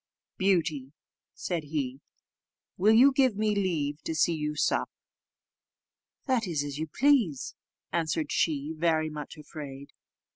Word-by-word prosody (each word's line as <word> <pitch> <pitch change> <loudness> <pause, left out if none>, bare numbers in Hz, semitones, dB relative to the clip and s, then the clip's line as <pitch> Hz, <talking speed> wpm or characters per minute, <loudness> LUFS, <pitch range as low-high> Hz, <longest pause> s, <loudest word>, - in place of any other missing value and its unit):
"Beauty," 160 -8 +1 0.4
said 170 -4 -3
he, 140 -3 -3 0.7
"will 215 +4 +4
you 265 +5 +7
give 260 -4 +3
me 215 0 +1
leave 160 -7 -1
to 160 - -4
see 165 +2 +3
you 150 -1 -3
sup?" - - +1 1.4
"That 250 -6 +1
is 155 -5 -1
as 145 0 -5
you 160 - -2
please," 210 - +2 0.4
answered 160 -2 -1
she, 150 -1 0
very 155 -1 +1
much 150 +1 -7
afraid. 145 -2 -9
160 Hz, 125 wpm, -28 LUFS, 145-195 Hz, 1.4 s, you